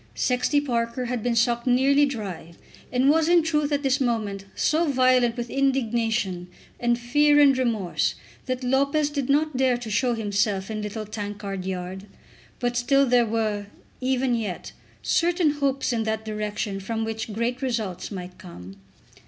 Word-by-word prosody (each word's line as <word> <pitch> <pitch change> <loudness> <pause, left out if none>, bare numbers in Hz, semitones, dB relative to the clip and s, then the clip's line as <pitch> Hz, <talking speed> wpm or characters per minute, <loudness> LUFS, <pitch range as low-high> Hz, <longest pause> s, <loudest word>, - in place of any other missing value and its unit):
Sexty 250 +3 +1
Parker 240 -2 -2
had 245 -1 -2
been 240 +1 0
sucked 235 +1 +1
nearly 275 +3 +4
dry, 195 -10 -6 0.4
and 255 +1 +2
was 320 +1 +2
in 345 -1 +5
truth 300 -2 0
at 285 0 0
this 270 +1 +1
moment 215 -6 -1
so 320 +2 +1
violent 255 -3 +3
with 240 -1 -4
indignation 230 -8 0 0.3
and 240 0 +1
fear 290 +5 +3
and 280 -2 +6
remorse 230 -8 0 0.3
that 255 0 -2
Lopez 280 +4 +1
did 280 -3 -3
not 300 +1 +2
dare 255 -2 +2
to 235 -3 -7
show 240 +2 +1
himself 205 -2 -1
in 215 -1 -3
Little 210 +1 -5
Tankard 205 -2 -5
Yard; 190 +1 -5 0.5
but 245 -1 -1
still 275 +3 +3
there 245 -2 +3
were, 215 -2 -1 0.3
even 260 0 0
yet, 215 -6 -3 0.3
certain 345 -2 +2
hopes 275 -3 -1
in 230 - 0
that 220 0 -2
direction 210 -2 -3
from 220 +3 -3
which 220 0 -4
great 235 +4 -2
results 225 -9 -3
might 180 -2 -8
come. 95 - -11
240 Hz, 160 wpm, -24 LUFS, 210-270 Hz, 0.5 s, and